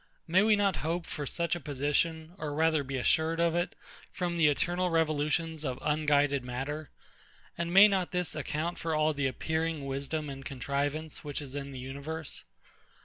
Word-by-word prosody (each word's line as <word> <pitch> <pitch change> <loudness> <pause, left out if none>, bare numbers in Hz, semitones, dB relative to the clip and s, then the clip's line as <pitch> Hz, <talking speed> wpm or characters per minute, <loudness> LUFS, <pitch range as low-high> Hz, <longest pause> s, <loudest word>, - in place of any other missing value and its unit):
May 180 +3 +5
we 215 +1 +5
not 200 -3 +2
hope 165 +2 -2
for 145 -2 -4
such 170 +4 0
a - - -4
position, 155 +3 -1
or 150 -4 -3
rather 160 -1 +3
be 135 0 -3
assured 160 +5 +2
of 170 -1 +3
it, 175 +1 -1 0.4
from 175 -2 -2
the 165 -2 +5
eternal 175 +5 +1
revolutions 160 0 +1
of 130 -4 -2
unguided 145 -2 +2
matter; 135 +5 -4 0.7
and 170 0 -2
may 195 +3 +9
not 190 -3 0
this 180 -2 -1
account 155 +3 -2
for 165 -1 -1
all 155 0 +3
the 140 -2 0
appearing 160 +2 -1
wisdom 140 +3 -3
and 135 -1 -7
contrivance 145 +4 -2
which 145 -2 -3
is 140 -3 -7
in 140 -1 -4
the 135 - -7
universe? 140 +4 -5
155 Hz, 175 wpm, -30 LUFS, 140-170 Hz, 0.7 s, may